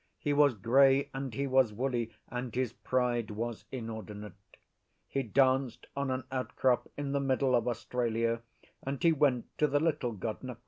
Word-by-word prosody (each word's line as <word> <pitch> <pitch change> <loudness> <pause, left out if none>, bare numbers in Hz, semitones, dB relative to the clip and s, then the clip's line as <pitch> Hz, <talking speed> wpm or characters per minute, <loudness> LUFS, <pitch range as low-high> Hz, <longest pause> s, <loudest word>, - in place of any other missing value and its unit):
He 145 - -1
was 145 -3 +5
grey 135 +6 +4
and 135 -1 -4
he 140 +5 -2
was 130 -4 +3
woolly, 120 0 -2 0.2
and 125 -2 -5
his 125 -2 0
pride 120 -3 0
was 115 +2 -4
inordinate: 110 -5 -6 0.7
he 135 - -1
danced 130 +1 +2
on 140 -1 -1
an 130 0 -1
outcrop 130 -1 +1
in 145 -1 -3
the 140 - +1
middle 135 -1 +1
of 120 -1 +2
Australia, 115 -1 -1 0.4
and 135 0 -4
he 170 - +6
went 140 -6 +1
to 150 - +4
the 145 0 +2
Little 150 -6 0
God 110 +2 -4
Nqa. 125 -3 -7
130 Hz, 170 wpm, -31 LUFS, 115-135 Hz, 0.7 s, he